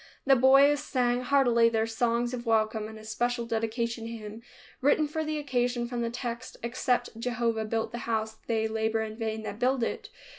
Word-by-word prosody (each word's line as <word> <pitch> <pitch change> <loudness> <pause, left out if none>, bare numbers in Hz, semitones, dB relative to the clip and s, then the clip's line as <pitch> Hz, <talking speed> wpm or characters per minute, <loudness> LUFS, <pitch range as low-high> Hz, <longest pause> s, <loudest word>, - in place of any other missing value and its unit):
The 270 -1 +6
boys 275 +3 +6
sang 245 -2 +1
heartily 245 -3 +4
their 225 -1 +1
songs 235 +1 0
of 240 -1 -5
welcome 220 -1 +1
and 220 0 -10
a 215 - -12
special 235 +2 -1
dedication 230 0 -2
hymn 220 -1 -8 0.4
written 290 +3 +3
for 315 +1 -2
the 310 0 -2
occasion 245 -4 -1
from 240 -1 -3
the 235 - -1
text, 240 +1 -5
"Except 245 -1 -1
Jehovah 230 -2 -1
build 225 +1 -2
the 240 - -5
house, 220 -1 -1
they 220 -1 +1
labor 220 0 0
in 215 0 -6
vain 220 -1 -3
that 215 0 -6
build 255 0 +2
it." - - -3
235 Hz, 185 wpm, -28 LUFS, 225-250 Hz, 0.4 s, The